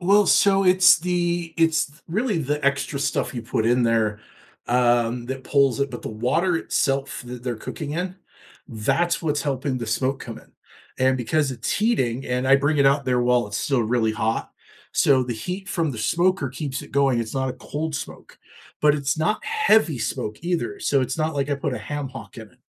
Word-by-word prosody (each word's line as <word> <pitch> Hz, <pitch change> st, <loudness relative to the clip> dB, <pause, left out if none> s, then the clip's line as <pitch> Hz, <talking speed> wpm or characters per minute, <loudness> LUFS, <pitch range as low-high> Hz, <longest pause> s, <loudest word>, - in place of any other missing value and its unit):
Well, 200 Hz, +3 st, +4 dB
so 195 Hz, 0 st, +4 dB
it's 180 Hz, -1 st, +6 dB
the 175 Hz, -1 st, -1 dB
it's 165 Hz, -1 st, +3 dB
th 145 Hz, +3 st, -21 dB
really, 210 Hz, +2 st, 0 dB
the 150 Hz, -1 st, -2 dB
extra 140 Hz, +1 st, 0 dB
stuff 140 Hz, -, -1 dB
you 120 Hz, -, -4 dB
put 110 Hz, -1 st, -1 dB
in 120 Hz, +1 st, +3 dB
there, 110 Hz, -2 st, +1 dB, 0.5 s
um, 120 Hz, -1 st, +2 dB
that 130 Hz, 0 st, -5 dB
pulls 140 Hz, -2 st, +2 dB
it, 140 Hz, 0 st, 0 dB
but 120 Hz, -, -7 dB
the -, -, -5 dB, 0.2 s
water 170 Hz, +6 st, +2 dB
itself 135 Hz, -3 st, -1 dB
that 125 Hz, 0 st, -8 dB
they're 120 Hz, -3 st, -3 dB
cooking 145 Hz, +6 st, -6 dB
in, 180 Hz, +3 st, -3 dB, 0.5 s
that's 135 Hz, +9 st, 0 dB
what's 150 Hz, -3 st, 0 dB
helping 135 Hz, -2 st, -2 dB
the 115 Hz, -, -5 dB
smoke 135 Hz, +3 st, -1 dB
come 115 Hz, -2 st, -7 dB
in. -, -, -20 dB, 0.5 s
And 130 Hz, 0 st, +3 dB
because 135 Hz, +4 st, 0 dB
it's 115 Hz, -2 st, -4 dB
heating, 135 Hz, -, 0 dB
and 125 Hz, +1 st, -1 dB
I 135 Hz, +1 st, +6 dB
bring 145 Hz, +2 st, +1 dB
it 140 Hz, -, +5 dB
out 140 Hz, +1 st, +3 dB
there 125 Hz, -1 st, +1 dB
while 120 Hz, -2 st, +2 dB
it's 105 Hz, -1 st, -5 dB
still 135 Hz, -1 st, +1 dB
really 110 Hz, -1 st, +1 dB
hot, 110 Hz, +1 st, -2 dB, 0.4 s
so 135 Hz, -2 st, +4 dB
the 125 Hz, -1 st, -3 dB
heat 185 Hz, +1 st, -4 dB
from 165 Hz, -4 st, 0 dB
the 115 Hz, -, -7 dB
smoker 175 Hz, -, +1 dB
keeps 135 Hz, 0 st, -4 dB
it -, -, -13 dB
going 135 Hz, -4 st, +2 dB
it's 110 Hz, -1 st, -5 dB
not 130 Hz, -1 st, 0 dB
a -, -, -2 dB
cold 150 Hz, +4 st, -5 dB
smoke, 140 Hz, -, -8 dB, 0.4 s
but 150 Hz, -1 st, +5 dB
it's 140 Hz, 0 st, -1 dB
not 160 Hz, +7 st, 0 dB
heavy 220 Hz, -, +3 dB
smoke 110 Hz, -1 st, -3 dB
either, 180 Hz, -, -2 dB
so 140 Hz, -, +2 dB
it's 130 Hz, +3 st, -2 dB
not 155 Hz, 0 st, 0 dB
like 140 Hz, 0 st, -1 dB
I 145 Hz, -, +1 dB
put -, -, -2 dB
a -, -, -4 dB
ham 145 Hz, -2 st, -5 dB
hock 130 Hz, 0 st, -11 dB
in 110 Hz, -2 st, -10 dB
it. -, -, -28 dB
140 Hz, 210 wpm, -23 LUFS, 125-165 Hz, 0.5 s, it's